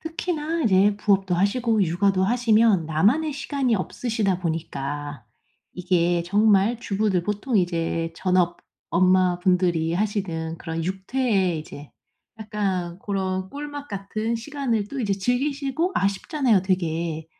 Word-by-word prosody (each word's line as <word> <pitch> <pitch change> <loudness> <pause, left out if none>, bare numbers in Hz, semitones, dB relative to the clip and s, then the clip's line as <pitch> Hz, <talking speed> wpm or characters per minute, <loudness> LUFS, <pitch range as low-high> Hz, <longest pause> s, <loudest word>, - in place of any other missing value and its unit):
특히나 325 0 -3
이제 200 -1 +4
부업도 195 -3 +1
하시고 220 +4 +1
육아도 190 +2 +1
하시면 225 -5 +3
나만의 215 - +2
시간이 270 -3 -1
없으시다 210 -1 -1
보니까 145 -5 -4 0.5
이게 175 -1 +1
정말 210 +4 +3
주부들 200 -4 0
보통 210 +5 -1
이제 165 -2 0
전업 180 -1 +1 0.3
엄마분들이 180 -2 +2
하시는 175 -5 -2
그런 165 -1 -4
육퇴에 190 -1 0
이제 145 -1 -10 0.5
약간 195 -5 -3
고런 190 -2 -2
꿀맛 290 +1 -7
같은 215 +3 -3
시간을 235 -4 -2
또 280 +2 -5
이제 205 -4 0
즐기시고 275 - -1
아쉽잖아요 200 - +1
되게. 165 -4 -2
195 Hz, 285 characters per minute, -24 LUFS, 175-230 Hz, 0.5 s, 이제